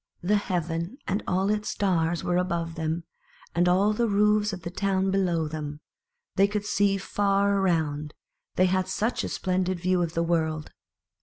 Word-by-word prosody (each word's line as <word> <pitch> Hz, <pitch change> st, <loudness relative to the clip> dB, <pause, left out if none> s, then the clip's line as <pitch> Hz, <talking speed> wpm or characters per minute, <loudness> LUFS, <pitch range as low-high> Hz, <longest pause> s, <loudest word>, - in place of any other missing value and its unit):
The 205 Hz, +4 st, +3 dB
heaven 175 Hz, +1 st, -2 dB
and 200 Hz, +3 st, 0 dB
all 190 Hz, +2 st, +1 dB
its 210 Hz, 0 st, -1 dB
stars 170 Hz, -4 st, 0 dB
were 175 Hz, -, +1 dB
above 170 Hz, -2 st, -1 dB
them, 160 Hz, +1 st, -2 dB, 0.5 s
and 175 Hz, +1 st, +3 dB
all 195 Hz, +4 st, +3 dB
the 235 Hz, +2 st, +1 dB
roofs 210 Hz, +1 st, +3 dB
of 180 Hz, -3 st, -7 dB
the 170 Hz, -, -5 dB
town 190 Hz, 0 st, 0 dB
below 175 Hz, -5 st, +1 dB
them; 150 Hz, -1 st, -5 dB, 0.6 s
they 195 Hz, -, +6 dB
could 205 Hz, 0 st, -3 dB
see 200 Hz, -1 st, +2 dB
far 200 Hz, 0 st, +1 dB
around, 155 Hz, -5 st, 0 dB, 0.4 s
they 185 Hz, -, +4 dB
had 185 Hz, 0 st, +1 dB
such 225 Hz, +4 st, -1 dB
a -, -, -3 dB
splendid 185 Hz, -1 st, -1 dB
view 185 Hz, +1 st, +1 dB
of 170 Hz, -1 st, -2 dB
the 165 Hz, -, +2 dB
world. 160 Hz, -2 st, -1 dB
185 Hz, 170 wpm, -26 LUFS, 165-200 Hz, 0.6 s, they